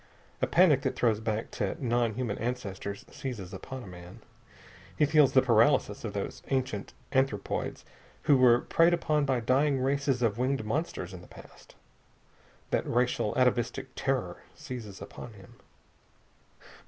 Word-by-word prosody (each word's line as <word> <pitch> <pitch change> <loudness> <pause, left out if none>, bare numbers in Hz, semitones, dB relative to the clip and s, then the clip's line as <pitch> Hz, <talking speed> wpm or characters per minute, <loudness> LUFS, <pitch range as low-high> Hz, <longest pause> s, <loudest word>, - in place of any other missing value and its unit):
A - - +2
panic 165 -7 +5
that - - -1
throws 115 -4 +2
back 110 0 -3
to 100 -4 -2
non 120 -3 0
human 120 -4 -3
ancestors 100 -4 -4
seizes 110 -8 -6
upon 130 +7 -7
a - - -11
man. 90 0 -11 0.8
He 150 - +4
feels 145 -2 +4
the 130 - +6
paralysis 115 -2 +3
of 110 -3 -4
those 100 -1 -4
ancient 130 -7 -2 0.2
anthropoids 130 -7 -1 0.4
who 150 -2 +5
were 125 -2 +5
preyed 170 +1 +4
upon 150 -3 +1
by 130 -3 +1
dying 135 +4 +2
races 135 -1 0
of 115 0 +1
winged 130 -2 0
monsters 110 - -3
in 90 - -9
the - - -14
past. - - -15 1.0
That - - 0
racial, 120 -3 0
atavistic 125 +1 +1
terror 135 -2 -2
seizes 110 -6 -8
upon 120 - -10
him. 95 -3 -16
125 Hz, 145 wpm, -29 LUFS, 105-135 Hz, 1.0 s, the